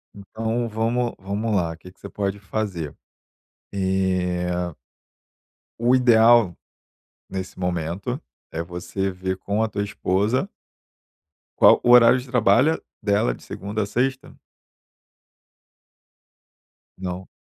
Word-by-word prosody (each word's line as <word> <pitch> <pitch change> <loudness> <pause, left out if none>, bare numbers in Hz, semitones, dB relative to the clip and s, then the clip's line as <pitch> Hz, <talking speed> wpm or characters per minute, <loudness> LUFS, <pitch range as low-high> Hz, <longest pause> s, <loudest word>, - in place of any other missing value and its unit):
Então 110 +4 -3
vamo 115 +2 -1
vamos 100 +3 -2
lá, 85 -3 -1
que 90 +2 -13
que 95 - -31
você - - -9
pode 100 0 -3
fazer. 95 -7 -4 0.8
Eh 90 -3 -1 1.1
o 120 +2 +3
ideal, 115 -6 +5 0.7
nesse 95 -1 -6
momento, 90 - -3 0.3
é 80 - -2
você 90 +3 -3
ver 95 0 -3
com 100 +3 -1
a 110 - +1
tua 100 0 -3
esposa 105 - 0 1.1
qual - - +7
o 120 - +3
horário 125 +1 +8
de 125 - -11
trabalha, 125 +6 +3 0.2
dela, 100 - +2
é - - -6
de - - -15
segunda 105 +2 -4
à 100 - -1
sexta? 130 +5 -2 2.6
Não. 90 0 -5
100 Hz, 115 wpm, -23 LUFS, 90-115 Hz, 2.6 s, horário